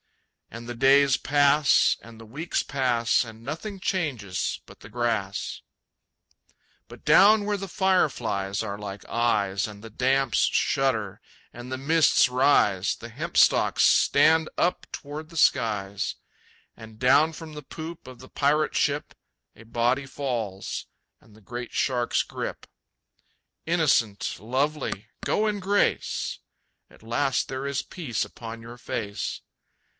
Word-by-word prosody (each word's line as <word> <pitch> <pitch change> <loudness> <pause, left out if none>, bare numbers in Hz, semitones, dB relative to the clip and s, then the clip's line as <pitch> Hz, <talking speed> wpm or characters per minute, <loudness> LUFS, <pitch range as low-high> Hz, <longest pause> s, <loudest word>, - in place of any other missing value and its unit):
And 115 +1 -8
the 120 - -4
days 135 +2 +5
pass, 145 0 +3
and 115 -1 -14
the 115 - -11
weeks 145 +10 -2
pass, 125 -4 +1
And 115 -1 -11
nothing 165 - -6
changes 135 - -2
but - - -16
the - - -12
grass. 115 -5 -2 1.3
But - - -14
down 205 +2 +6
where 210 0 0
the 195 -1 -6
fireflies 120 - 0
are 100 -2 -4
like 100 -1 -8
eyes, 100 -5 0
And 105 -1 -11
the 115 - -10
damps 130 +2 +1
shudder, 115 -8 0 0.3
and 120 +2 -9
the 130 - -2
mists 155 +1 +4
rise, 125 -7 +2
The - - -10
hemp - - -5
stalks - - +4
stand 160 0 +4
up 175 - 0
toward 150 +2 -7
the 165 - -10
skies. 100 -8 +1 0.6
And 110 -1 -13
down 140 +6 +4
from 160 -1 -10
the 150 - -7
poop 160 +4 -9
of 130 -1 -11
the 130 - -12
pirate 150 +2 +1
ship 145 0 0 0.4
A 115 - -14
body 120 +4 0
falls, 115 -9 -4 0.3
and 110 - -21
the 110 - -18
great 120 +4 -7
sharks 125 -3 +1
grip. - - -6 1.0
Innocent, 145 -11 +1
lovely, 130 -2 -2 0.2
go 215 - +1
in 210 -1 -1
grace! 200 +2 0 0.5
At - - -20
last 125 +4 0
there 130 +1 -4
is 140 -1 -2
peace 145 - -3
upon 115 -1 -9
your 120 +2 -10
face. 105 -4 -4
130 Hz, 135 wpm, -26 LUFS, 115-150 Hz, 1.3 s, down